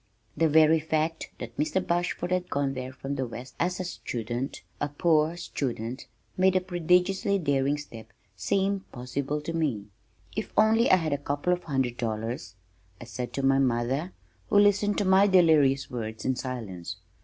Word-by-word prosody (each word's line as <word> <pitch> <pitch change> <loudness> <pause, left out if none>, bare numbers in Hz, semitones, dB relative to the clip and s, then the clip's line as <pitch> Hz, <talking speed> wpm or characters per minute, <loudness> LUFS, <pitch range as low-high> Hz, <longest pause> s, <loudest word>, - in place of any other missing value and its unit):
The 165 -1 +2
very 160 +1 +5
fact 160 +1 -1
that 120 -1 -8
Mr. 155 +5 +1
Bashford 175 +1 -1
had 180 -1 0
gone 140 -1 0
there 130 0 -5
from 135 +2 -5
the 130 -1 -1
west 125 +2 -9
as 180 +2 0
a - - -1
student, 120 -6 -4 0.2
a 145 - -1
poor 155 +2 +2
student, 130 -7 -4 0.3
made 185 0 +4
the - - +5
prodigiously 180 +2 +1
daring 140 -4 +1
step 115 -6 -10 0.2
seem 195 - 0
possible 135 +4 -3
to 165 - -5
me. 130 -11 -1 0.5
"If 215 - -4
only 220 +2 +5
I - - +8
had 160 -5 -1
a 145 - -1
couple 145 +5 0
of 180 0 -4
hundred 130 -5 -1
dollars," 115 -2 -4 0.4
I - - -8
said 125 +1 -5
to 140 - -2
my 135 0 +4
mother 130 +6 0 0.4
who - - +3
listened 205 0 +4
to 205 - +1
my 190 +2 +5
delirious 155 -8 +4
words 110 -2 -5
in 130 - +1
silence. 100 -10 -5
145 Hz, 170 wpm, -27 LUFS, 125-180 Hz, 0.5 s, I